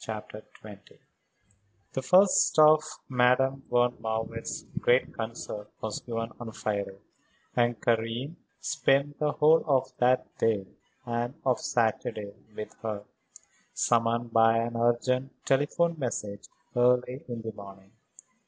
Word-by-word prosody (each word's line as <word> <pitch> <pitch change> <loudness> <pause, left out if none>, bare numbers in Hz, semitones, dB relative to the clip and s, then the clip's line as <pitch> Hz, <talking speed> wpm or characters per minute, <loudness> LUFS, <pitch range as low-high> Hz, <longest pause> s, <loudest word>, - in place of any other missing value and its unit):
CHAPTER 110 -1 -7 0.2
XX 105 -1 -13 1.0
The 130 - -2
first 185 +9 +4
of 155 0 +7 0.3
Madame 130 +2 +2
von 120 0 +2
Marwitz's 110 0 -4
great 125 +1 +2
concerts 110 -2 -6
was 110 -1 -4
given 115 -1 -4
on 120 -2 -6
Friday, 100 -3 -3 0.6
and 120 -2 +2
Karen 115 +7 -1 0.2
spent 145 -2 +1
the 150 -1 +1
whole 155 +2 +4
of 135 -3 +1
that 125 +1 +3
day 105 -4 +1 0.4
and 120 +2 -2
of 130 -2 +2
Saturday 110 -3 -1 0.2
with 105 - -7
her, 105 -2 -4 0.7
summoned 115 0 +1
by 115 0 +5
an 115 +1 -1
urgent 125 +3 +1
telephone 160 +5 +1
message 105 -6 -4 0.3
early 125 +3 +2
in 120 -2 -6
the 110 - -4
morning. 100 -2 -13
120 Hz, 120 wpm, -28 LUFS, 110-130 Hz, 1.0 s, of